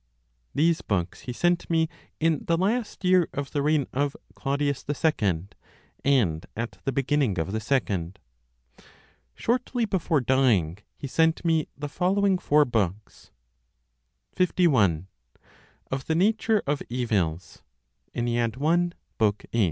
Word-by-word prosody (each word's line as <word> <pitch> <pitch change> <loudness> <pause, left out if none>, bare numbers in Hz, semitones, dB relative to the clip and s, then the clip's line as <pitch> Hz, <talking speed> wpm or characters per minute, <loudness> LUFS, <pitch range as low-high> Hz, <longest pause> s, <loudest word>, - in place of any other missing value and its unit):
These 165 +2 +3
books 90 -4 -2
he - - 0
sent 175 +7 0
me 160 -1 +2 0.3
in 160 -2 +1
the 165 - +2
last 205 +2 -1
year 180 -2 +4
of 140 -1 -3
the 145 - 0
reign 150 -1 +2
of 140 +1 0 0.2
Claudius 140 0 -1
II, 105 - +1 0.6
and 105 - +2
at 115 +1 -5
the 135 - +1
beginning 135 -5 +1
of 80 +2 -2
the 110 - -1
second. 100 -7 -1 1.2
Shortly 245 0 0
before 180 -6 +1
dying, 115 -10 +2 0.2
he - - -7
sent 160 +5 +1
me 160 -2 +2
the 145 +1 -4
following 190 +5 +1
four 150 -2 +4
books: 105 -4 -3 1.0
51. 130 - +2 0.9
Of 130 0 -3
the 160 - +1
Nature 215 +4 +2
of 145 0 -1
Evils. 95 -9 -1 0.5
i. 120 +9 +1
140 Hz, 120 wpm, -26 LUFS, 115-165 Hz, 1.2 s, year